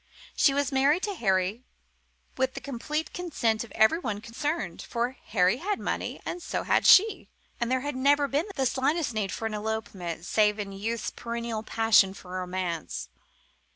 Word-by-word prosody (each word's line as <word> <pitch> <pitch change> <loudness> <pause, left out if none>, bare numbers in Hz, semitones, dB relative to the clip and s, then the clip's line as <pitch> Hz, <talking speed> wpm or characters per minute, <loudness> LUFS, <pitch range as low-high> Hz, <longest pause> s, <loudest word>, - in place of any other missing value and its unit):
She 280 - +5
was 285 -1 0
married 280 +6 +3
to 415 - -1
Harry, 195 - 0 0.7
with 260 0 0
the - - -3
complete 295 +4 -4
consent 240 -11 -1
of 235 - -13
everyone 220 - +2
concerned, 235 - -3
for 240 +1 -2
Harry 180 +6 +2
had 395 +7 -2
money, - - -3
and 350 - -4
so - - -3
had - - +2
she, 430 +3 +6 0.3
and 240 0 -1
there 260 0 +2
had 290 0 -3
never 285 +2 +3
been 290 +7 0
the 270 -2 0
slightest 280 +3 0
need 210 -3 -1
for 225 - -4
an 220 - -2
elopement, 210 -6 -4
save 210 +1 +3
in 205 -2 -4
youth's 215 +3 -3
perennial 235 -1 -4
passion 215 -3 +3
for 180 - -12
romance. 180 - -4
235 Hz, 165 wpm, -27 LUFS, 210-285 Hz, 0.7 s, she